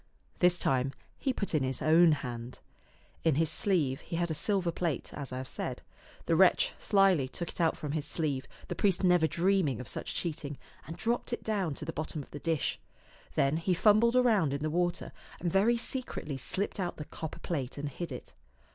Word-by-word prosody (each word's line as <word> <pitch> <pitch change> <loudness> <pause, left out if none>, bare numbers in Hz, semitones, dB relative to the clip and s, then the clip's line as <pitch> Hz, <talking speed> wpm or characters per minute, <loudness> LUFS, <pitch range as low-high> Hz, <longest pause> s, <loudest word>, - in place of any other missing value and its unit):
This 180 0 +4
time 135 -3 +1 0.3
he 270 - +1
put 200 -7 -3
in 155 - +3
his 130 -1 -1
own 165 +2 +6
hand. 125 -3 -5 0.7
In 160 -4 +3
his 160 +1 +2
sleeve 155 -9 +1
he - - -6
had 170 0 0
a - - +1
silver 180 +3 +1
plate, 165 -5 -2
as 140 -3 -6
I 130 - -4
have 130 0 -5
said. - - -4 0.4
The - - +2
wretch - - +4
slyly 195 -9 +4
took 170 +5 -5
it - - -4
out 165 - +2
from 150 - -4
his 150 -1 -2
sleeve, 145 -5 -2 0.2
the - - -3
priest 195 -2 +2
never 180 -3 +5
dreaming 170 - +1
of 125 - -7
such - - -4
cheating, 150 -4 -3 0.3
and 165 - -7
dropped 240 +2 -1
it - - -3
down 195 -9 -1
to 150 - -6
the 165 - -4
bottom 155 -1 -4
of - - -20
the 145 - -7
dish. 165 -4 -1 0.6
Then 140 +3 +2
he 175 +2 +1
fumbled 215 +6 +5
around 215 - +3
in 140 - -4
the 155 - -1
water 175 +1 0 0.3
and 175 - -1
very 220 +5 +4
secretly 240 - -1
slipped 195 +10 -2
out 180 -2 -2
the 150 - -6
copper 160 0 -7
plate 140 -7 -3
and 145 +1 -3
hid 155 +3 -5
it. 125 - -8
165 Hz, 205 wpm, -31 LUFS, 145-190 Hz, 0.7 s, own